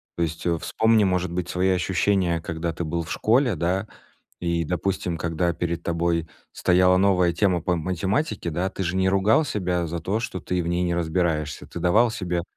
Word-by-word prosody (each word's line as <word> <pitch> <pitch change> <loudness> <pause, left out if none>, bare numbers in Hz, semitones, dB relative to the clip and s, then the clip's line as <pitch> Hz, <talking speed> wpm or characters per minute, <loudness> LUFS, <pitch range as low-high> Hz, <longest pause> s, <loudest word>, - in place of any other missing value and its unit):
То 85 - 0
есть, 80 0 -4
э, 85 -1 +1
вспомни, 110 +3 +2
может 90 -2 0
быть, 90 0 -3
свои 90 +1 +1
ощущения, 90 -1 +1
когда 85 0 -3
ты 85 - -4
был 85 +2 -2
в 80 - -9
школе, 120 +2 +2
да, 95 +5 -1 0.5
и, 85 -1 0
допустим, 90 0 -2
когда 85 +1 0
перед 85 +1 -3
тобой 85 -1 0 0.3
стояла 90 0 +3
новая 90 -2 +3
тема 90 -1 +2
по 90 +1 0
математике, 95 - -1
да, 90 +4 -1
ты 95 - -5
же 90 0 -1
не 95 0 +2
ругал 100 +10 +3
себя 90 - -1
за 85 +1 -4
то, 100 +6 -1
что 95 -5 -4
ты 90 +2 -2
в - - -5
ней 85 +1 0
не 85 -1 0
разбираешься. 80 -3 -1
Ты - - -8
давал 115 +7 +4
себе 90 -5 -2
90 Hz, 195 wpm, -24 LUFS, 85-95 Hz, 0.5 s, давал